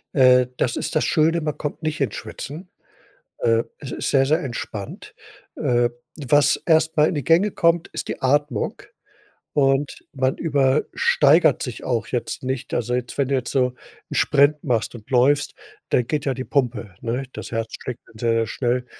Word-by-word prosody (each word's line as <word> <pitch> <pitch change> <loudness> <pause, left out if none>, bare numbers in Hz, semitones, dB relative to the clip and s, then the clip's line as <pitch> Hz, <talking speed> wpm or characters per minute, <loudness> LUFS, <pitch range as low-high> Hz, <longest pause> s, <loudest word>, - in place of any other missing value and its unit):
Äh, 125 -2 +6
das 120 - 0
ist - - -3
das - - +3
Schöne, 165 +2 +2
man 150 -1 -3
kommt 150 +1 -5
nicht 155 0 -2
ins - - 0
Schwitzen. 160 +6 -8 0.7
Äh, 115 0 +2
es 135 - -8
ist - - -2
sehr, 135 -1 +4
sehr 155 +5 +2
entspannt. 115 -5 -6 0.4
Äh, 120 -1 +2 0.4
was 145 -1 +4
erst 160 0 +3
mal 150 0 +5
in - - -2
die 145 - -2
Gänge 170 - +4
kommt, 170 -2 +2
ist - - -6
die - - -5
Atmung. 140 -3 0 0.7
Und 135 0 +1
man 130 -1 0
übersteigert 145 +1 +3
sich 125 - -6
auch 115 -3 -1
jetzt 125 - -3
nicht. 130 -1 -3
Also 120 +1 -1
jetzt 125 -1 -3
wenn 140 -2 +1
du 140 - 0
jetzt 125 -2 -3
so 125 -2 +1 0.4
'n - - -5
Sprint 145 +1 +3
machst 120 -4 0
und 110 +1 -15
läufst, 135 +3 +3 0.4
dann 120 - +2
geht 150 -2 -1
ja 135 -2 0
die 130 - -4
Pumpe, 120 -9 -1
ne? 120 +3 -2
Das - - -8
Herz 115 0 -3
schlägt 125 -2 -6
dann 110 - -16
sehr 115 -1 +1
schnell. 125 +1 -1
135 Hz, 180 wpm, -22 LUFS, 120-150 Hz, 0.7 s, Äh